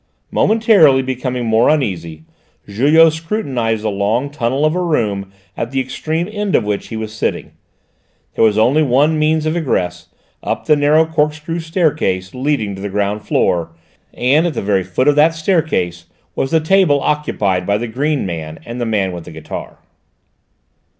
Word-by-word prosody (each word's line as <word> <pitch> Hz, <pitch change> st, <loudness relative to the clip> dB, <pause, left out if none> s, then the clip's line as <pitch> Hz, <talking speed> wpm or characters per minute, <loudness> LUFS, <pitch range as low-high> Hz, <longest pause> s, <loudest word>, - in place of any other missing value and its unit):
Momentarily 205 Hz, -, +4 dB
becoming 125 Hz, -1 st, -3 dB
more 110 Hz, +1 st, +3 dB
uneasy, 85 Hz, -, -2 dB, 0.4 s
Julot 150 Hz, +10 st, +4 dB
scrutinised 135 Hz, -, -2 dB
the 110 Hz, -, 0 dB
long 110 Hz, +8 st, -1 dB
tunnel 135 Hz, +1 st, 0 dB
of 155 Hz, -, +2 dB
a 180 Hz, -, -1 dB
room 105 Hz, -, -1 dB, 0.2 s
at 115 Hz, -, -3 dB
the 135 Hz, +1 st, -2 dB
extreme 160 Hz, +6 st, -3 dB
end 210 Hz, -2 st, -1 dB
of -, -, +3 dB
which 105 Hz, -1 st, -3 dB
he 115 Hz, -, -6 dB
was 110 Hz, -1 st, -5 dB
sitting; 110 Hz, -, -3 dB, 0.8 s
there -, -, +1 dB
was 110 Hz, -2 st, +3 dB
only 130 Hz, +8 st, +3 dB
one 150 Hz, +3 st, +2 dB
means 155 Hz, 0 st, +1 dB
of 155 Hz, +1 st, 0 dB
egress, 90 Hz, -, -2 dB, 0.3 s
up -, -, -3 dB
the 150 Hz, -, +4 dB
narrow 150 Hz, +2 st, +3 dB
corkscrew 155 Hz, +1 st, -1 dB
staircase 155 Hz, -, -1 dB
leading 130 Hz, -6 st, -1 dB
to 95 Hz, -, -8 dB
the 100 Hz, -, -4 dB
ground 105 Hz, +1 st, -2 dB
floor, 85 Hz, -1 st, 0 dB, 0.4 s
and 145 Hz, +7 st, +2 dB
at 165 Hz, -, -4 dB
the -, -, -2 dB
very 100 Hz, -2 st, +1 dB
foot 95 Hz, +9 st, -1 dB
of 145 Hz, -, +4 dB
that 160 Hz, +2 st, +4 dB
staircase 155 Hz, -, -1 dB, 0.3 s
was 135 Hz, -, -1 dB
the 160 Hz, -, +3 dB
table 160 Hz, -3 st, +3 dB
occupied 100 Hz, -13 st, -1 dB
by 100 Hz, 0 st, +2 dB
the 120 Hz, +3 st, -4 dB
green 140 Hz, +4 st, -1 dB
man 80 Hz, -3 st, -5 dB
and 120 Hz, +1 st, -6 dB
the 120 Hz, -, -1 dB
man 100 Hz, -4 st, 0 dB
with 85 Hz, -2 st, -8 dB
the -, -, -10 dB
guitar. 80 Hz, -1 st, -8 dB
130 Hz, 170 wpm, -17 LUFS, 100-155 Hz, 0.8 s, Momentarily